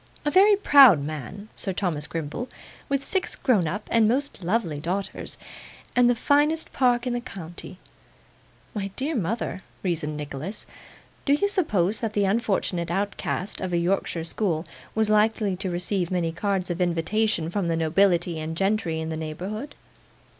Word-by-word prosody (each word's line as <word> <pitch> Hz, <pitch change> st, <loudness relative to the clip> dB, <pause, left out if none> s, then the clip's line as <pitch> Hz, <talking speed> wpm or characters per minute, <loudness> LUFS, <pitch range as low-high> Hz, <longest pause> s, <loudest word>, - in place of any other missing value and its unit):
'A 295 Hz, -, +2 dB
very 400 Hz, +4 st, +7 dB
proud 275 Hz, -, +8 dB
man, 155 Hz, +8 st, -6 dB
Sir 195 Hz, -, -2 dB
Thomas 170 Hz, -6 st, -2 dB
Grimble, 165 Hz, -, -4 dB, 0.4 s
with 275 Hz, 0 st, 0 dB
six 380 Hz, +5 st, -1 dB
grown 210 Hz, -, +2 dB
up 205 Hz, +7 st, -4 dB
and 225 Hz, -2 st, +5 dB
most 265 Hz, -3 st, -1 dB
lovely 175 Hz, -5 st, 0 dB
daughters, 185 Hz, +6 st, -4 dB, 0.6 s
and 245 Hz, 0 st, +5 dB
the 245 Hz, -, +3 dB
finest 295 Hz, +6 st, +2 dB
park 245 Hz, -2 st, +2 dB
in 250 Hz, -, -1 dB
the 240 Hz, -, -1 dB
county.' 180 Hz, -5 st, -7 dB, 1.0 s
'My 200 Hz, -3 st, -3 dB
dear 290 Hz, +5 st, -1 dB
mother,' 215 Hz, -, -2 dB, 0.2 s
reasoned 155 Hz, -5 st, -1 dB
Nicholas, 150 Hz, +7 st, -5 dB, 0.6 s
'do 280 Hz, -, +4 dB
you 350 Hz, +8 st, +3 dB
suppose 215 Hz, -, +1 dB
that 225 Hz, -2 st, -2 dB
the 205 Hz, -1 st, +2 dB
unfortunate 195 Hz, -5 st, 0 dB
outcast 195 Hz, +1 st, -2 dB
of 185 Hz, -1 st, -3 dB
a -, -, +3 dB
Yorkshire 170 Hz, -1 st, 0 dB
school 165 Hz, -1 st, -1 dB, 0.3 s
was 220 Hz, 0 st, +3 dB
likely 215 Hz, -2 st, +2 dB
to 190 Hz, 0 st, -2 dB
receive 180 Hz, 0 st, -1 dB
many 175 Hz, -3 st, 0 dB
cards 185 Hz, +1 st, -1 dB
of 175 Hz, +1 st, -3 dB
invitation 175 Hz, +1 st, +1 dB
from 195 Hz, -2 st, -1 dB
the 165 Hz, -1 st, 0 dB
nobility 170 Hz, 0 st, +2 dB
and 160 Hz, +1 st, -4 dB
gentry 195 Hz, -4 st, 0 dB
in 160 Hz, 0 st, -3 dB
the 160 Hz, -, -3 dB
neighbourhood? 185 Hz, -, -5 dB
195 Hz, 160 wpm, -25 LUFS, 170-230 Hz, 1.0 s, proud